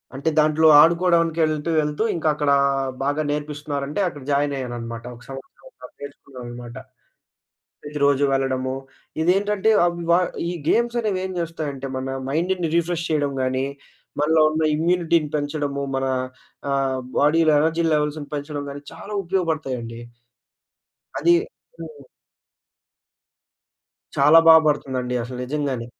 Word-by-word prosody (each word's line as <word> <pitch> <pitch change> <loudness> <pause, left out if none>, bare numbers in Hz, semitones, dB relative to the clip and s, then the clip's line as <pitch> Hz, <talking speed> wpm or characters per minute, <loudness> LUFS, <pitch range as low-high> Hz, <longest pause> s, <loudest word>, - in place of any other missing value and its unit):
అంటే 140 +4 -1
దాంట్లో 155 +1 +4
ఆడుకోవడానికి 170 -1 +3
ఎళ్తూ 155 +1 -2
ఎళ్తూ, 150 +6 -2
ఇంకక్కడా 150 -3 +1 0.5
బాగా 145 +2 0
నేర్పిస్తున్నారంటే, 150 +1 -4
అక్కడ 145 -5 -7
జాయినయ్యాననమాట. 125 -5 -2
ఒక 120 - -16
సంవత్సరమున్నర 275 - -12
నేర్చుకున్నామనమాట. 125 -4 -10 1.1
ప్రతిరోజు 145 -1 +1
వెళ్ళడము, 130 -1 -1 0.5
ఇదేంటంటే 200 +4 +2 0.2
అవి 170 0 -3
వా 170 - +6 0.3
ఈ - - -3 0.2
గేమ్సనేవేం 220 -5 0
జేస్తాయంటే, 155 -5 -4
మన 130 0 -4 0.2
మైండుని 170 +3 -1
రిఫ్రెష్ 170 0 -1
చేయడం 145 -3 0
గాని, 130 +1 -1 0.5
మనలో 155 +1 +3
ఉన్న 155 +1 -1
ఇమ్యూనిటీని 170 -1 +1
పెంచడము, 145 -1 -3
మన 135 0 -1 0.6
ఆహ్, 135 -1 0 0.2
బాడీలో 155 +2 +4
ఎనర్జీ 165 +2 +1
లెవెల్స్‌ని 150 0 -2
పెంచడం 145 0 -4
గాని 140 0 -8
చాలా 210 - -10
ఉపయోగపడతాయండి. 140 -10 -2 1.2
అదీ 345 - +5 0.5
హ్మ్. 460 - -9 2.2
చాలా 150 +4 +7
బా 165 - +10
బడుతుందండి, 130 -4 -1
అసలు 125 +1 -7
నిజంగానే. 135 -3 -3
150 Hz, 105 wpm, -22 LUFS, 135-165 Hz, 2.2 s, బా